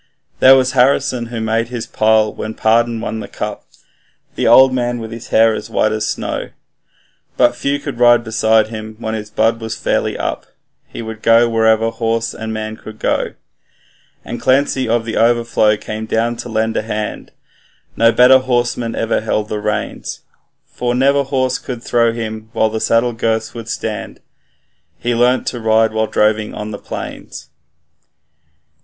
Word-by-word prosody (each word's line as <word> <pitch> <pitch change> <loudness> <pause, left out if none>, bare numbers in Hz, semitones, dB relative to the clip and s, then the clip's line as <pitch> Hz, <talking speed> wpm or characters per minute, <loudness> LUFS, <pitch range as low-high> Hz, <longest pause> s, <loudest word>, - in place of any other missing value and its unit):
There 130 +1 +8
was 130 -1 +2
Harrison, 130 -2 +2
who 115 -1 -5
made 110 +1 0
his 120 -2 -5
pile 110 0 +2
when 110 0 -6
Pardon 115 +1 +2
won 110 -1 -4
the - - -7
cup, - - -6 0.7
The - - -1
old 130 0 +7
man 120 -1 -1
with 115 -1 -7
his 115 0 -8
hair 115 0 +4
as - - -6
white 110 - +1
as 110 0 -2
snow; - - -3 0.9
But 120 0 +3
few 140 +3 -1
could 140 -4 -6
ride 120 -1 +5
beside 110 -1 +2
him 110 -1 -7
when 110 -1 -4
his 105 -1 -5
blood 115 +2 +1
was 110 0 -4
fairly - - -1
up - - -4 0.4
He - - -8
would 110 -1 -8
go 115 +1 +5
wherever 110 0 +2
horse 115 0 -2
and 110 0 -6
man 110 0 -5
could 110 0 -11
go. - - -1 0.9
And - - -6
Clancy 130 -2 +1
of 115 0 +1
the 115 - -3
Overflow 115 -2 +2
came 110 +1 -6
down 115 +2 0
to 120 - -7
lend 110 0 -1
a - - +1
hand, 110 -1 -5 0.6
No 115 0 +4
better 125 +2 +6
horseman 120 -2 -1
ever 115 - 0
held 110 -1 -2
the 105 - -3
reins; 105 0 -4 0.4
For 120 0 -3
never 140 +2 +3
horse 130 -2 -1
could 125 -2 -7
throw 115 -1 +2
him 110 -1 -6
while 110 -1 +1
the 110 0 -3
saddle 120 +1 +2
girths 110 -1 -1
would 115 -1 -8
stand, 110 -4 -5 0.8
He 120 +1 -1
learnt 125 +2 +2
to 120 - -6
ride 110 0 +2
while 110 0 0
droving 105 0 0
on 105 +1 -5
the 105 - -6
plains. - - -8
115 Hz, 170 wpm, -17 LUFS, 110-120 Hz, 0.9 s, There